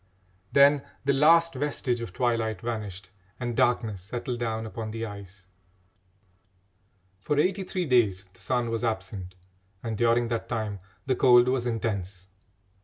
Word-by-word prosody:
Then 140 0 +6 0.2
the 140 - +3
last 165 +4 +5
vestige 130 -3 -1
of 115 - -5
twilight 115 -3 0
vanished 105 -5 -5 0.3
and 120 -2 -3
darkness 120 -6 +1
settled 120 +5 -4
down 110 -2 -2
upon 110 0 -5
the 115 +1 -4
ice. 100 -2 -10 1.7
For 145 +10 -1
eighty 190 +6 +2
three 185 -1 -2
days 110 - +2
the - - -18
sun 120 -2 -1
was 115 +1 -2
absent, 95 -4 -3 0.5
and 115 -1 -3
during 115 +1 +2
that 115 -1 -3
time 110 -4 -3 0.3
the 130 -1 +1
cold 125 -1 +6
was 125 -1 0
intense. 100 -5 -3
115 Hz, 140 wpm, -27 LUFS, 105-125 Hz, 1.7 s, Then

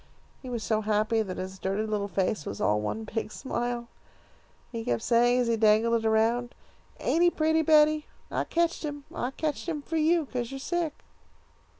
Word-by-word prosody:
He 255 - -8
was 235 -3 -3
so 215 +3 +1
happy 215 +1 +1
that 190 -4 -4
his 190 +1 -6
dirty 195 +3 -1
little 210 -2 -1
face 195 -3 -1
was 100 - -6
all 105 +2 +2
one 215 - -3
big 220 0 -4
smile. 240 -2 -3 0.8
He 230 -2 -4
kept 120 - -1
saying, 240 +1 +4
as 245 - 0
he 230 - +2
dangled 225 +1 +3
it - - +2
around, 230 +2 +1 0.4
'Ain't 330 - +1
he 350 - +6
pretty, 320 -1 +2
Betty? 305 -1 +4 0.2
I - - -1
ketched 340 0 0
him. 290 -2 -5
I 245 - -2
ketched 305 +4 -3
him 300 -3 -3
for 325 - -2
you, 320 +1 +3
'cause 245 -3 -4
you're 270 - -5
sick.' 335 +1 -2
235 Hz, 190 wpm, -28 LUFS, 215-300 Hz, 0.8 s, he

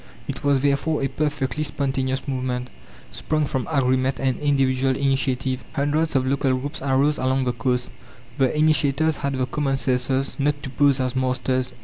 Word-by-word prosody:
It - - -5
was 140 -2 +3
therefore 145 +2 +1
a - - +2
perfectly 145 0 -2
spontaneous 135 -2 -2
movement, 125 -2 -3 0.4
sprung 155 -1 -1
from 130 -2 -2
agreement 130 -2 +1
and 130 -1 0
individual 135 -2 +2
initiative. 130 -1 0
Hundreds 150 +2 0
of 130 -1 +2
local 135 -1 +1
groups 145 +4 -5
arose 140 +2 +2
along 130 +1 +1
the 125 - 0
coasts. 125 -1 -1 0.5
The 135 +2 +2
initiators 155 0 +2
had 140 0 -2
the 130 -1 0
common 135 +1 -1
senses 130 +1 0
not 145 +1 0
to 135 - -5
pose 140 0 +3
as 130 0 -1
masters. 130 0 0
135 Hz, 160 wpm, -23 LUFS, 130-145 Hz, 0.5 s, was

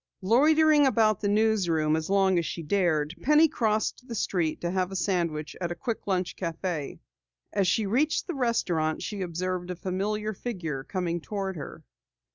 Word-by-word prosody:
Loitering 300 +6 +5
about 215 -5 +2
the 205 - 0
newsroom 195 -8 +2
as 160 +1 -3
long 195 -2 +3
as 170 - -2
she 165 - -5
dared, 160 -3 +1
Penny 300 +3 +5
crossed 220 0 -1
the 235 - -5
street 175 -6 -1
to 170 - -1
have 185 0 -1
a - - -5
sandwich 170 -5 -1
at 175 -1 -2
a - - -3
quick 220 +6 -4
lunch 185 -2 -1
cafe. 165 -3 -4 0.5
As 195 -2 +2
she 210 +4 +2
reached 265 +10 +1
the 355 - -4
restaurant 180 - 0
she 205 -2 -4
observed 180 +1 -3
a 180 - -3
familiar 205 +4 -2
figure 175 - -4
coming 175 0 -2
toward 195 0 -4
her. 155 - -8
190 Hz, 170 wpm, -27 LUFS, 170-220 Hz, 0.5 s, Loitering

